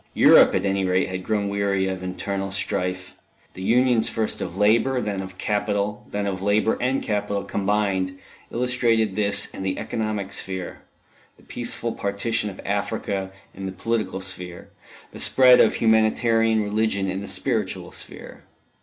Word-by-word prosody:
Europe, -, -, +7 dB
at 95 Hz, -, 0 dB
any 95 Hz, 0 st, +1 dB
rate, 95 Hz, 0 st, +1 dB
had 95 Hz, 0 st, -5 dB
grown 105 Hz, -1 st, -1 dB
weary 100 Hz, -1 st, 0 dB
of 95 Hz, -1 st, -3 dB
internal 95 Hz, +1 st, -4 dB
strife; 95 Hz, -2 st, -3 dB, 0.4 s
the 95 Hz, -, -9 dB
unions 120 Hz, +3 st, +3 dB
first 110 Hz, -1 st, -2 dB
of 90 Hz, 0 st, -5 dB
Labour, 115 Hz, +6 st, +3 dB
then 105 Hz, -4 st, -2 dB
of 95 Hz, 0 st, -9 dB
Capital, 105 Hz, 0 st, -1 dB
then 100 Hz, 0 st, -2 dB
of 95 Hz, -2 st, -3 dB
Labour 105 Hz, +3 st, +2 dB
and 130 Hz, +2 st, 0 dB
Capital 105 Hz, -1 st, -2 dB
combined, 95 Hz, -2 st, -1 dB, 0.3 s
illustrated 115 Hz, -4 st, +1 dB
this 100 Hz, -1 st, +2 dB
in -, -, -7 dB
the 95 Hz, -1 st, -2 dB
economic 110 Hz, -3 st, -3 dB
sphere; 95 Hz, -2 st, -3 dB, 0.6 s
the -, -, -21 dB
peaceful 120 Hz, -1 st, -2 dB
partition 105 Hz, +2 st, -1 dB
of 95 Hz, -, -11 dB
Africa 100 Hz, -1 st, -2 dB, 0.2 s
in 95 Hz, 0 st, -6 dB
the -, -, -4 dB
political 105 Hz, +1 st, -2 dB
sphere; 90 Hz, -2 st, -6 dB, 0.4 s
the -, -, -10 dB
spread 125 Hz, -1 st, +6 dB
of -, -, +3 dB
Humanitarian 110 Hz, 0 st, +3 dB
religion 105 Hz, -1 st, 0 dB
in 95 Hz, +1 st, -3 dB
the 100 Hz, -, -7 dB
spiritual -, -, -2 dB
sphere. -, -, -9 dB
100 Hz, 155 wpm, -23 LUFS, 95-110 Hz, 0.6 s, Europe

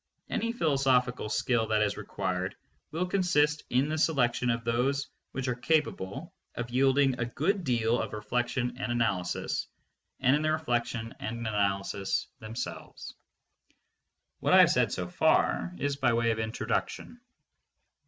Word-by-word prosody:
Any 230 Hz, -, 0 dB
philosophical 135 Hz, -, +1 dB
skill, 110 Hz, +1 st, +1 dB
that 110 Hz, -1 st, +2 dB
is 105 Hz, -, 0 dB
required 95 Hz, 0 st, -3 dB, 0.3 s
will 165 Hz, +4 st, -1 dB
consist 165 Hz, -6 st, +2 dB
in 130 Hz, +3 st, +2 dB
the 155 Hz, +1 st, -2 dB
selection 125 Hz, -6 st, +2 dB
of 115 Hz, 0 st, 0 dB
those 130 Hz, +4 st, 0 dB, 0.2 s
which 135 Hz, 0 st, -3 dB
are 125 Hz, -, +1 dB
capable 135 Hz, -, -1 dB, 0.2 s
of 120 Hz, 0 st, -4 dB
yielding 135 Hz, 0 st, +3 dB
a 120 Hz, -, 0 dB
good 175 Hz, -, -1 dB
deal 120 Hz, -4 st, +1 dB
of -, -, -4 dB
reflection 120 Hz, +3 st, -2 dB
and 125 Hz, -, -2 dB
analysis, 105 Hz, -7 st, -1 dB, 0.5 s
and 130 Hz, +1 st, +4 dB
in 150 Hz, -, 0 dB
the 155 Hz, 0 st, +1 dB
reflection 120 Hz, -7 st, -1 dB
and 115 Hz, +2 st, -4 dB
analysis 100 Hz, -2 st, 0 dB
themselves. 110 Hz, +2 st, -7 dB, 1.3 s
What -, -, +1 dB
I -, -, +10 dB
have -, -, +6 dB
said -, -, +2 dB
so -, -, -3 dB
far 85 Hz, -, +2 dB
is 140 Hz, +4 st, -1 dB
by 130 Hz, -, +2 dB
way 115 Hz, 0 st, +2 dB
of 110 Hz, -, -2 dB
introduction. 110 Hz, -, -3 dB
125 Hz, 145 wpm, -29 LUFS, 115-140 Hz, 1.3 s, I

